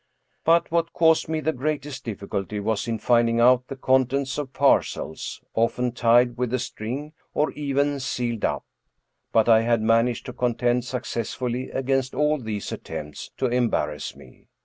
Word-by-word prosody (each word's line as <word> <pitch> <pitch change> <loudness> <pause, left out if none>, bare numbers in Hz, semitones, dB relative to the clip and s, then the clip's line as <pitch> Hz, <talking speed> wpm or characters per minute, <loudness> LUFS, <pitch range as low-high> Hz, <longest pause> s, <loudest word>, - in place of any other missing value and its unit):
But 165 0 +3
what 165 0 0
caused 160 -1 +3
me 160 -1 -1
the 160 +2 0
greatest 145 0 -3
difficulty 100 -1 -4
was 110 +2 -1
in 115 -1 -1
finding 115 0 +3
out 125 +1 +5
the 135 - -6
contents 130 +1 +1
of 140 -3 -4
parcels, 135 - 0
often 120 +2 +1
tied 120 0 +3
with 125 -2 0
a - - +1
string, 130 +5 -5 0.2
or 150 - +2
even 145 0 0
sealed 120 -4 -2
up. - - -1 0.7
But 110 0 +3
I 110 -1 +6
had 115 -1 +1
managed 115 +1 +2
to - - -6
contend 120 0 0
successfully 125 0 -3
against 135 0 -1
all 150 0 +2
these 110 -4 -4
attempts 75 -1 -7
to - - 0
embarrass 115 - 0
me. 65 - -17
125 Hz, 155 wpm, -24 LUFS, 115-140 Hz, 0.7 s, I